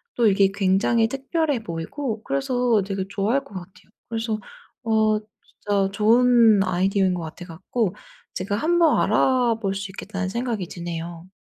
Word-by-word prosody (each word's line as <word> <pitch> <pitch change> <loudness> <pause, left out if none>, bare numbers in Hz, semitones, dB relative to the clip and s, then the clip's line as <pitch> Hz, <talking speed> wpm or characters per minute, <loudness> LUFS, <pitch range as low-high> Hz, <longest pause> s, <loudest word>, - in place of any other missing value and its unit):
또 235 -2 +3
이게 195 -1 +4
굉장히 200 +4 +2
특별해 275 -1 -1
보이고 215 - -5
그래서 250 -5 +1
되게 195 -1 -3
좋아할 215 +7 0
것 275 - -17
같아요. 185 +1 -11 0.2
그래서 225 -1 -2 0.4
어 220 -1 +2
진짜 205 -2 -3
좋은 225 0 +5
아이디어인 190 +1 +1
것 175 - -3
같아 160 +3 -8
갖고 185 +4 -3 0.4
제가 200 +2 -2
한번 330 +5 +3
알아볼 225 -3 +2
수 195 0 -5
있겠다는 195 -1 -5
생각이 230 -3 -3
드네요. 170 0 -7
210 Hz, 315 characters per minute, -23 LUFS, 190-235 Hz, 0.4 s, 좋은